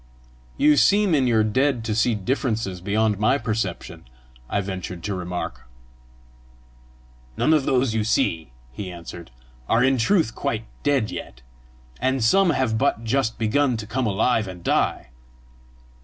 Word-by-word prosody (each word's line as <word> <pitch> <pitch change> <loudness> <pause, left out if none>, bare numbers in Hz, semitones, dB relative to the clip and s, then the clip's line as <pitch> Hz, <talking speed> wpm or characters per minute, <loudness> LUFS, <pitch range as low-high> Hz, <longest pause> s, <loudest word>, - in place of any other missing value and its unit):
"You 150 0 +4
seem 195 - +4
in 135 -4 +3
your 110 -2 +3
dead 125 +2 +1
to 110 - -1
see 110 +2 +2
differences 110 -4 -2
beyond 105 +1 0
my 110 +6 +3
perception!" 110 -7 -4 0.4
I - - 0
ventured 95 -3 -5
to 105 - -2
remark. 90 -7 -5 1.7
"None 160 - +3
of 150 -4 +2
those 130 -3 +1
you 110 -1 0
see," 80 - 0 0.2
he 95 +7 -6
answered, 85 -2 -10 0.4
"are 115 +2 +3
in 130 -1 +2
truth 160 - +2
quite 115 0 -3 0.2
dead 135 -7 +1
yet, - - -8 0.6
and 130 -1 0
some 190 +11 +4
have 120 -8 0
but 115 - +1
just 115 0 0
begun 125 +3 +1
to 110 - -6
come 125 +2 -2
alive 105 +2 +1
and 90 -2 -9
die. 65 - 0
110 Hz, 145 wpm, -23 LUFS, 100-130 Hz, 1.7 s, You